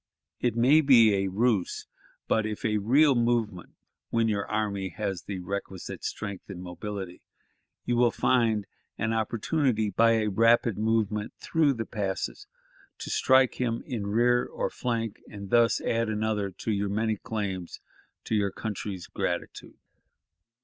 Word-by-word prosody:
It 120 Hz, -3 st, 0 dB
may 130 Hz, +7 st, +5 dB
be 120 Hz, -7 st, +6 dB
a 95 Hz, 0 st, +1 dB
ruse, 105 Hz, 0 st, 0 dB, 0.4 s
but, 110 Hz, -1 st, +1 dB
if 105 Hz, -1 st, -5 dB
a 105 Hz, -1 st, +1 dB
real 135 Hz, +8 st, +4 dB
movement, 115 Hz, -6 st, -1 dB, 0.3 s
when 115 Hz, -1 st, +1 dB
your 100 Hz, -2 st, -1 dB
army 100 Hz, -3 st, -2 dB
has 100 Hz, -4 st, -2 dB
the 100 Hz, -, -6 dB
requisite 95 Hz, 0 st, -6 dB
strength 100 Hz, -3 st, -5 dB
and 95 Hz, -3 st, -7 dB
mobility, 90 Hz, +1 st, -6 dB, 0.6 s
you 120 Hz, -, 0 dB
will 120 Hz, 0 st, +5 dB
probably -, -, -13 dB
find 110 Hz, -5 st, +2 dB, 0.3 s
an 115 Hz, +1 st, -1 dB
opportunity, 115 Hz, 0 st, 0 dB
by 115 Hz, +4 st, +4 dB
a 110 Hz, -1 st, +1 dB
rapid 115 Hz, 0 st, +3 dB
movement 110 Hz, -1 st, 0 dB
through 155 Hz, -4 st, +2 dB
the 115 Hz, -3 st, -4 dB
passes, 105 Hz, -, -4 dB, 0.5 s
to -, -, -6 dB
strike 130 Hz, -1 st, +3 dB
him 115 Hz, -2 st, -1 dB
in 115 Hz, -7 st, -4 dB
rear 120 Hz, +3 st, +3 dB
or -, -, -3 dB
flank, 115 Hz, -3 st, -3 dB
and 100 Hz, -2 st, -9 dB
thus 120 Hz, -1 st, +4 dB
add 115 Hz, -1 st, 0 dB
another 105 Hz, -2 st, -1 dB
to 105 Hz, +4 st, -4 dB
your 100 Hz, -1 st, -1 dB
many 110 Hz, +2 st, 0 dB
claims 95 Hz, -5 st, -4 dB, 0.4 s
to -, -, -4 dB
your 100 Hz, -2 st, +2 dB
country's 100 Hz, -3 st, -5 dB
gratitude.... -, -, -4 dB
110 Hz, 150 wpm, -27 LUFS, 100-115 Hz, 0.6 s, be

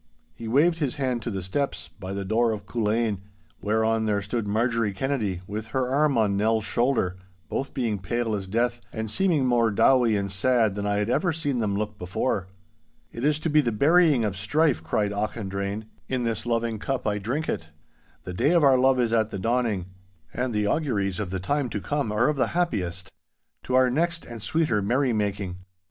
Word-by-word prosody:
He 115 Hz, +7 st, -8 dB
waved 160 Hz, +8 st, +3 dB
his 140 Hz, -6 st, -1 dB
hand 130 Hz, -4 st, -1 dB
to 120 Hz, -, -4 dB
the 95 Hz, -4 st, -4 dB
steps, 140 Hz, +10 st, -2 dB
by 95 Hz, -2 st, -9 dB
the 100 Hz, 0 st, -3 dB
door 115 Hz, +3 st, +2 dB
of 100 Hz, -2 st, -7 dB
Culzean, 110 Hz, -1 st, 0 dB, 0.4 s
whereon 110 Hz, +1 st, +1 dB
there 100 Hz, -1 st, 0 dB
stood 105 Hz, +1 st, -3 dB
Marjorie 115 Hz, 0 st, +1 dB
Kennedy, 105 Hz, -6 st, -1 dB
with 105 Hz, +2 st, -5 dB
her 130 Hz, +2 st, -1 dB
arm 140 Hz, 0 st, +2 dB
on 105 Hz, -3 st, +2 dB
Nell's 110 Hz, +2 st, +2 dB
shoulder, 120 Hz, -9 st, +1 dB, 0.3 s
both 135 Hz, -, -3 dB
being 115 Hz, -7 st, -1 dB
pale 115 Hz, +4 st, -2 dB
as 100 Hz, -2 st, -3 dB
death, 120 Hz, +3 st, 0 dB
and 110 Hz, -1 st, -4 dB
seeming 175 Hz, -, +2 dB
more 120 Hz, -2 st, +3 dB
dowie 120 Hz, +1 st, +4 dB
and 100 Hz, -1 st, -2 dB
sad 110 Hz, +2 st, +2 dB
than 100 Hz, 0 st, -3 dB
I 105 Hz, -, +1 dB
had 105 Hz, +3 st, 0 dB
ever 170 Hz, +7 st, +2 dB
seen 145 Hz, -5 st, -1 dB
them 100 Hz, -3 st, 0 dB
look 105 Hz, 0 st, -4 dB
before. 90 Hz, +2 st, -1 dB, 0.7 s
'It 115 Hz, -, -6 dB
is 150 Hz, +1 st, +3 dB
to 165 Hz, -, -1 dB
be 150 Hz, 0 st, +5 dB
the 120 Hz, -4 st, 0 dB
burying 145 Hz, +1 st, +4 dB
of 100 Hz, -2 st, -2 dB
strife,' 130 Hz, -, +1 dB
cried 100 Hz, +5 st, 0 dB
Auchendrayne; 100 Hz, 0 st, -3 dB, 0.2 s
'in 130 Hz, -2 st, -1 dB
this 115 Hz, 0 st, -2 dB
loving 115 Hz, -2 st, 0 dB
cup 135 Hz, +4 st, -2 dB
I 105 Hz, -1 st, 0 dB
drink 130 Hz, +10 st, -2 dB
it. 80 Hz, 0 st, -3 dB, 0.5 s
The 90 Hz, -, -6 dB
day 135 Hz, -, +2 dB
of 170 Hz, -3 st, +4 dB
our 135 Hz, -2 st, +6 dB
love 130 Hz, 0 st, +4 dB
is 115 Hz, -2 st, +1 dB
at 110 Hz, -2 st, +2 dB
the 100 Hz, -, -5 dB
dawning, 115 Hz, -3 st, 0 dB, 0.5 s
and 125 Hz, 0 st, -1 dB
the 105 Hz, -2 st, 0 dB
auguries 100 Hz, -, 0 dB
of 105 Hz, -4 st, -3 dB
the 95 Hz, +1 st, -3 dB
time 140 Hz, +7 st, -1 dB
to 105 Hz, -, -3 dB
come 140 Hz, 0 st, -2 dB
are 105 Hz, +3 st, +2 dB
of 150 Hz, -1 st, 0 dB
the 130 Hz, -, +2 dB
happiest. 95 Hz, -, -1 dB, 0.5 s
To 130 Hz, -, 0 dB
our 130 Hz, -1 st, +5 dB
next 170 Hz, +4 st, 0 dB
and 115 Hz, -2 st, -8 dB
sweeter 150 Hz, -5 st, +1 dB
merrymaking! 105 Hz, -5 st, 0 dB
115 Hz, 200 wpm, -25 LUFS, 100-130 Hz, 0.7 s, our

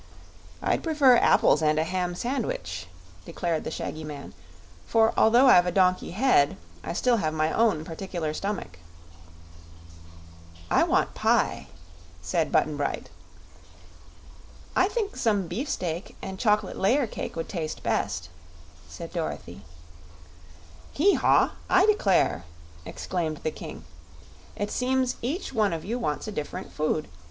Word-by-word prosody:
"I'd -, -, +1 dB
prefer 290 Hz, -7 st, +5 dB
apples 155 Hz, -, +4 dB
and 155 Hz, 0 st, +2 dB
a 155 Hz, -, +3 dB
ham 180 Hz, +1 st, -2 dB
sandwich," 135 Hz, -, -3 dB, 0.4 s
declared 165 Hz, -, -2 dB
the -, -, -4 dB
shaggy 155 Hz, 0 st, -5 dB
man, 145 Hz, -2 st, -8 dB, 0.5 s
"for 225 Hz, -1 st, +3 dB
although 240 Hz, +4 st, +5 dB
I've 180 Hz, -8 st, +6 dB
a -, -, +1 dB
donkey 185 Hz, 0 st, +2 dB
head, 190 Hz, -, +3 dB, 0.3 s
I -, -, -4 dB
still 240 Hz, +6 st, +2 dB
have 155 Hz, -6 st, -1 dB
my 155 Hz, 0 st, +1 dB
own 215 Hz, -9 st, +2 dB
particular 165 Hz, -2 st, -4 dB
stomach." 195 Hz, -, -4 dB, 1.9 s
"I -, -, +4 dB
want -, -, +1 dB
pie," -, -, +1 dB, 0.5 s
said 85 Hz, -, -1 dB
Button 150 Hz, -1 st, +2 dB
Bright. 145 Hz, -, -3 dB, 1.6 s
"I 370 Hz, -, +4 dB
think 420 Hz, -1 st, -2 dB
some 205 Hz, -4 st, +1 dB
beefsteak 175 Hz, -, -4 dB
and 190 Hz, 0 st, -7 dB
chocolate 210 Hz, -3 st, +1 dB
layer 250 Hz, +8 st, +3 dB
cake 220 Hz, -, -6 dB
would 165 Hz, -, -4 dB
taste 160 Hz, -5 st, -5 dB
best," 80 Hz, 0 st, -1 dB, 0.6 s
said 170 Hz, -1 st, -9 dB
Dorothy. 100 Hz, -, -5 dB, 1.3 s
"Hee 385 Hz, +7 st, +4 dB
haw! -, -, +3 dB, 0.2 s
I 375 Hz, +1 st, +5 dB
declare!" 210 Hz, -, +2 dB, 0.4 s
exclaimed 160 Hz, -4 st, -3 dB
the 155 Hz, -, 0 dB
King. -, -, -9 dB, 0.7 s
"It 205 Hz, 0 st, -3 dB
seems 255 Hz, 0 st, 0 dB
each 280 Hz, -, -3 dB
one 215 Hz, -6 st, +2 dB
of 160 Hz, -, -5 dB
you 235 Hz, +5 st, -2 dB
wants 150 Hz, -3 st, -2 dB
a -, -, -4 dB
different 150 Hz, -7 st, -5 dB
food. 155 Hz, 0 st, -1 dB
185 Hz, 130 wpm, -26 LUFS, 155-235 Hz, 1.9 s, I've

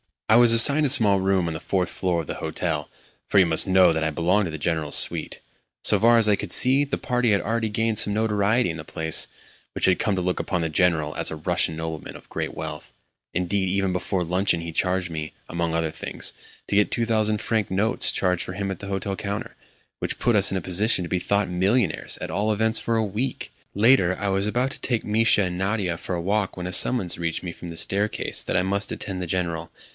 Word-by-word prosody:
I 110 Hz, -, +5 dB
was 120 Hz, -1 st, +6 dB
assigned 140 Hz, +6 st, +6 dB
a -, -, +2 dB
small 105 Hz, -7 st, +4 dB
room 95 Hz, -2 st, +1 dB
on 80 Hz, -, -3 dB
the 80 Hz, -, -5 dB
fourth 90 Hz, 0 st, -1 dB
floor 90 Hz, -3 st, -1 dB
of 80 Hz, -, -11 dB
the -, -, -5 dB
hotel -, -, -3 dB, 0.4 s
(for -, -, +1 dB
you 95 Hz, -, +6 dB
must 80 Hz, +2 st, +2 dB
know 95 Hz, -1 st, +5 dB
that 80 Hz, 0 st, -2 dB
I 80 Hz, -, 0 dB
belonged 90 Hz, +6 st, +1 dB
to 85 Hz, -, -5 dB
the 80 Hz, -, -5 dB
General's 80 Hz, -1 st, -1 dB
suite). -, -, 0 dB, 0.4 s
So 105 Hz, -, +4 dB
far 115 Hz, +3 st, +5 dB
as 110 Hz, -2 st, +3 dB
I 105 Hz, -, +3 dB
could -, -, -3 dB
see, 135 Hz, +3 st, +5 dB
the 140 Hz, -, -3 dB
party 125 Hz, -2 st, 0 dB
had 100 Hz, -, +2 dB
already 115 Hz, +1 st, -1 dB
gained 110 Hz, +1 st, -1 dB
some 105 Hz, -, +4 dB
notoriety 110 Hz, 0 st, +1 dB
in 80 Hz, -, -5 dB
the 75 Hz, -, -9 dB
place, 80 Hz, 0 st, 0 dB, 0.5 s
which -, -, +1 dB
had 95 Hz, -2 st, +3 dB
come 105 Hz, -, 0 dB
to 90 Hz, -, -2 dB
look 90 Hz, 0 st, -2 dB
upon 90 Hz, -2 st, -2 dB
the 80 Hz, -, -1 dB
General 80 Hz, -2 st, +1 dB
as -, -, 0 dB
a -, -, -5 dB
Russian 80 Hz, +1 st, 0 dB
nobleman 80 Hz, -1 st, -6 dB
of -, -, -14 dB
great -, -, -4 dB
wealth. -, -, -7 dB, 0.4 s
Indeed, 95 Hz, +2 st, -1 dB
even 95 Hz, +1 st, 0 dB
before 90 Hz, 0 st, -2 dB
luncheon 90 Hz, 0 st, +1 dB
he 85 Hz, 0 st, -6 dB
charged 90 Hz, +1 st, -1 dB
me, 80 Hz, -1 st, -5 dB, 0.2 s
among 85 Hz, -1 st, -2 dB
other 80 Hz, -1 st, -1 dB
things, -, -, -5 dB, 0.4 s
to -, -, -1 dB
get 105 Hz, 0 st, +2 dB
two 115 Hz, -, 0 dB
thousand 110 Hz, -2 st, +1 dB
franc 110 Hz, -3 st, -1 dB
notes 105 Hz, +6 st, +2 dB
changed 90 Hz, -2 st, 0 dB
for 90 Hz, -, -7 dB
him 100 Hz, 0 st, -3 dB
at 95 Hz, -, -6 dB
the 100 Hz, -, -7 dB
hotel 95 Hz, 0 st, -3 dB
counter, 100 Hz, 0 st, -5 dB, 0.4 s
which -, -, -4 dB
put 120 Hz, -3 st, +1 dB
us 100 Hz, -, +5 dB
in 95 Hz, -, -1 dB
a -, -, -3 dB
position 95 Hz, +3 st, +1 dB
to 85 Hz, -, -6 dB
be 90 Hz, -, 0 dB
thought 100 Hz, +1 st, 0 dB
millionaires 95 Hz, +2 st, 0 dB
at -, -, -5 dB
all 105 Hz, +5 st, 0 dB
events 110 Hz, +1 st, +2 dB
for 115 Hz, -, -2 dB
a 110 Hz, -, +1 dB
week! 110 Hz, +6 st, -4 dB, 0.2 s
Later, 100 Hz, -4 st, +4 dB
I 100 Hz, -, -2 dB
was 95 Hz, +1 st, 0 dB
about 125 Hz, +5 st, -1 dB
to -, -, -8 dB
take 120 Hz, -3 st, -2 dB
Mischa 110 Hz, -1 st, +3 dB
and 90 Hz, -1 st, -3 dB
Nadia 95 Hz, -2 st, -1 dB
for 90 Hz, -, -5 dB
a 85 Hz, -, -3 dB
walk 100 Hz, +2 st, -1 dB
when 90 Hz, -1 st, -5 dB
a 90 Hz, -, -5 dB
summons 90 Hz, -3 st, +2 dB
reached 85 Hz, 0 st, -3 dB
me 90 Hz, -, -5 dB
from 85 Hz, -, -11 dB
the 85 Hz, -1 st, -6 dB
staircase 105 Hz, +5 st, 0 dB
that -, -, -1 dB
I 90 Hz, -, +2 dB
must 100 Hz, +2 st, -1 dB
attend 95 Hz, -2 st, -6 dB
the 90 Hz, -, -4 dB
General. 85 Hz, -2 st, -3 dB
95 Hz, 240 wpm, -23 LUFS, 85-110 Hz, 0.5 s, was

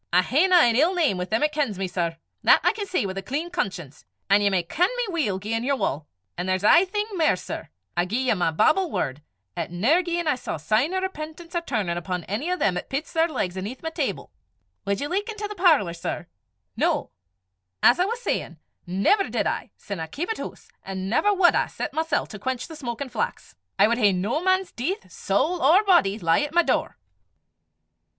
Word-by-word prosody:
I 180 Hz, +1 st, +4 dB
haena 340 Hz, -, +3 dB
an 240 Hz, -10 st, +6 dB
ill 325 Hz, +9 st, +3 dB
name 300 Hz, -, +1 dB
wi' 180 Hz, -, -1 dB
them 220 Hz, +8 st, 0 dB
'at 300 Hz, -, +2 dB
kens 280 Hz, -10 st, -1 dB
me, 190 Hz, 0 st, -2 dB
sir; 170 Hz, -2 st, -2 dB, 0.2 s
that -, -, +6 dB
I -, -, +4 dB
can 420 Hz, -2 st, -5 dB
say 365 Hz, -, 0 dB
wi' 190 Hz, -, -3 dB
a 195 Hz, -, -3 dB
clean 295 Hz, -, -4 dB
conscience; 170 Hz, -, -4 dB, 0.3 s
an' 200 Hz, +1 st, +6 dB
ye 205 Hz, -, +3 dB
may 185 Hz, -3 st, +1 dB
ken 345 Hz, -, +1 dB
me -, -, 0 dB
weel 245 Hz, -, 0 dB
gien 225 Hz, +4 st, -2 dB
ye 270 Hz, -, 0 dB
wull. 155 Hz, -, -2 dB, 0.3 s
An' 180 Hz, -, -2 dB
there's 185 Hz, +1 st, 0 dB
jist -, -, +7 dB
ae 345 Hz, +3 st, +6 dB
thing 415 Hz, +2 st, -2 dB
mair, 325 Hz, -5 st, +3 dB
sir: -, -, -7 dB, 0.3 s
I 175 Hz, 0 st, +2 dB
gie 210 Hz, -, -3 dB
ye -, -, +4 dB
my 180 Hz, -5 st, +1 dB
Bible 310 Hz, -, +2 dB
word, 135 Hz, -, -2 dB, 0.3 s
'at -, -, -3 dB
never, 240 Hz, -, +3 dB
gien 345 Hz, -1 st, -2 dB
I 300 Hz, -, +4 dB
saw 255 Hz, -, -5 dB
sign 215 Hz, -, +1 dB
o' 375 Hz, -, 0 dB
repentance 335 Hz, -2 st, -6 dB
or 345 Hz, -, +1 dB
turnin' 205 Hz, -, -2 dB
upo' 180 Hz, 0 st, -4 dB
ane 225 Hz, -, -2 dB
o' 365 Hz, -, 0 dB
them 180 Hz, -, +1 dB
'at -, -, -6 dB
pits 280 Hz, +4 st, -3 dB
their 325 Hz, 0 st, +3 dB
legs 195 Hz, -, -3 dB
aneth 205 Hz, +10 st, -6 dB
my 320 Hz, -, -3 dB
table -, -, -3 dB, 0.6 s
Wad 200 Hz, 0 st, 0 dB
ye 290 Hz, -, -1 dB
luik 400 Hz, +7 st, -2 dB
intil 425 Hz, -1 st, -4 dB
the 420 Hz, -, -6 dB
parlour, 320 Hz, -, +3 dB
sir? 170 Hz, +1 st, -4 dB, 0.5 s
No! -, -, 0 dB, 0.7 s
as 245 Hz, -, +6 dB
I 365 Hz, -, +4 dB
was 465 Hz, +4 st, -3 dB
sayin', 175 Hz, -, -2 dB, 0.3 s
never 200 Hz, -, +2 dB
did -, -, -1 dB
I, -, -, -2 dB
sin 200 Hz, -4 st, -6 dB
I 160 Hz, -, -4 dB
keepit 350 Hz, -, -3 dB
hoose, -, -, -8 dB
an' 190 Hz, 0 st, -5 dB
never 410 Hz, -, +3 dB
wad 380 Hz, -3 st, +5 dB
I -, -, +1 dB
set -, -, -5 dB
mysel' 320 Hz, -1 st, 0 dB
to 210 Hz, -, -10 dB
quench 260 Hz, +2 st, -3 dB
the 325 Hz, -, -9 dB
smokin' 260 Hz, -1 st, -5 dB
flax; 470 Hz, -, -4 dB, 0.2 s
I -, -, +6 dB
wad 235 Hz, +2 st, 0 dB
hae 205 Hz, -4 st, +4 dB
no 205 Hz, -, -1 dB
man's 375 Hz, 0 st, +1 dB
deith, 370 Hz, -, -4 dB
sowl 350 Hz, +1 st, 0 dB
or 340 Hz, +10 st, +5 dB
body, 345 Hz, -, +4 dB
lie 165 Hz, -, +2 dB
at 295 Hz, +2 st, -4 dB
my 345 Hz, -, +6 dB
door." -, -, -1 dB
265 Hz, 225 wpm, -24 LUFS, -, 0.7 s, jist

